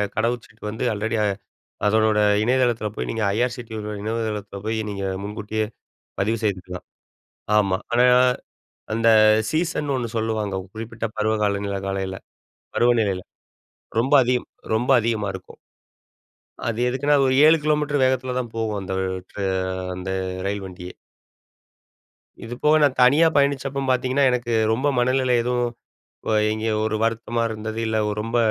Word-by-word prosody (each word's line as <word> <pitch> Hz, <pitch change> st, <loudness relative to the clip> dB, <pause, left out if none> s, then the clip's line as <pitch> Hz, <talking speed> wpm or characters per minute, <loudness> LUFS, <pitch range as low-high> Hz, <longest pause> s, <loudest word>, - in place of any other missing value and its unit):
கடவு 115 Hz, +3 st, +1 dB
சீட்டு 110 Hz, 0 st, -21 dB
வந்து 110 Hz, -, -4 dB
ஆல்ரெடி 110 Hz, +2 st, -2 dB, 0.7 s
அதனோட 110 Hz, 0 st, +3 dB, 0.2 s
இணையதளத்தில 120 Hz, -3 st, +1 dB
போய் -, -, -4 dB
நீங்க 115 Hz, -1 st, -2 dB
ஐஆர்சுடியோட 115 Hz, -3 st, -3 dB
இணையதளத்தில 105 Hz, -2 st, -3 dB
போயி, 110 Hz, 0 st, -1 dB
நீங்க 100 Hz, -1 st, -4 dB, 0.2 s
முன்கூட்டியே 105 Hz, +1 st, -3 dB, 0.5 s
பதிவு 110 Hz, +4 st, +1 dB
செய்துக்கலாம். 90 Hz, -3 st, -3 dB, 0.7 s
ஆமா. 95 Hz, -2 st, +2 dB
ஆனா, 120 Hz, +1 st, +4 dB, 0.9 s
அந்த 115 Hz, +1 st, +1 dB, 0.4 s
சீசன்னு 155 Hz, -4 st, 0 dB
ஒண்ணு 120 Hz, -2 st, -3 dB
சொல்லுவாங்க. 110 Hz, -3 st, -1 dB, 0.2 s
குறிப்பிட்ட 115 Hz, +1 st, -5 dB
பருவகால 105 Hz, -2 st, +1 dB
நிலை 100 Hz, -1 st, -2 dB
காலநிலைல 95 Hz, -1 st, -3 dB, 0.6 s
பருவநிலையில. 110 Hz, -6 st, +2 dB, 0.8 s
ரொம்ப 135 Hz, +4 st, +1 dB
அதிகம் 125 Hz, 0 st, 0 dB, 0.3 s
ரொம்ப 120 Hz, +4 st, 0 dB
அதிகமா 110 Hz, -3 st, -1 dB
இருக்கும். 95 Hz, -, -10 dB, 1.1 s
அது 115 Hz, -1 st, -2 dB
எதுக்குன்னா? 145 Hz, +3 st, +2 dB
ஒரு 130 Hz, 0 st, +2 dB
7 160 Hz, -, +7 dB
கிலோமீட்டர் 150 Hz, -2 st, +1 dB
வேகத்தில 130 Hz, -1 st, 0 dB
தான் 120 Hz, -2 st, -6 dB
போகும். 110 Hz, -2 st, -1 dB
அந்த 95 Hz, 0 st, -6 dB, 0.4 s
ட்ரா 100 Hz, -, -5 dB, 0.5 s
அந்த 95 Hz, +1 st, -5 dB, 0.4 s
ரயில் 100 Hz, -1 st, -2 dB
வண்டியே. 90 Hz, -1 st, -9 dB, 1.5 s
இது 120 Hz, +2 st, -6 dB
போக, 150 Hz, +1 st, +5 dB
நான் 135 Hz, -3 st, +2 dB
தனியா 145 Hz, +6 st, +6 dB
பயணிச்சப்ப 140 Hz, -1 st, +1 dB
பாத்தீங்கன்னா 130 Hz, +2 st, +2 dB
எனக்கு 120 Hz, -1 st, -2 dB, 0.2 s
ரொம்ப 130 Hz, +6 st, 0 dB
மனநிலை 130 Hz, 0 st, +2 dB
எதுவும் 120 Hz, 0 st, 0 dB, 0.6 s
வ -, -, -1 dB, 0.2 s
எங்கேயோ 110 Hz, 0 st, -1 dB
ஒரு 110 Hz, -, -1 dB
வருத்தமா 115 Hz, +1 st, -1 dB
இருந்தது, 110 Hz, 0 st, -5 dB
இல்ல 110 Hz, 0 st, 0 dB, 0.2 s
ரொம்ப 115 Hz, +2 st, -2 dB
115 Hz, 130 wpm, -23 LUFS, 105-125 Hz, 1.5 s, 7